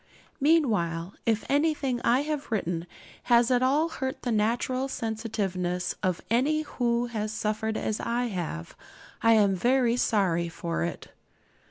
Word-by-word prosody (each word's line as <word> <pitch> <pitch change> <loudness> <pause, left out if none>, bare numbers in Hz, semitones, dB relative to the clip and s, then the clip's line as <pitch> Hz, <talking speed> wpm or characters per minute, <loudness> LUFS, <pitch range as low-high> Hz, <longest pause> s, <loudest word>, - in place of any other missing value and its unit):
Meanwhile, 210 - +2
if 225 -1 +1
anything 285 -4 +1
I 245 +3 +3
have 300 -1 -3
written 175 -5 -1 0.4
has 235 0 +4
at 250 -1 +3
all 285 +5 +3
hurt 265 -5 -4
the 245 - -1
natural 240 +4 0
sensitiveness 205 -7 -2
of 185 -2 0
any 295 +6 +2
who 240 -4 0
has 215 -3 -3
suffered 220 0 -2
as 215 - -2
I 240 +1 -1
have, 165 - -5 0.5
I 230 0 +5
am 205 -3 +4
very 245 +4 +2
sorry 175 -8 +1
for 165 0 -3
it. 170 -1 -5
230 Hz, 140 wpm, -27 LUFS, 190-255 Hz, 0.5 s, I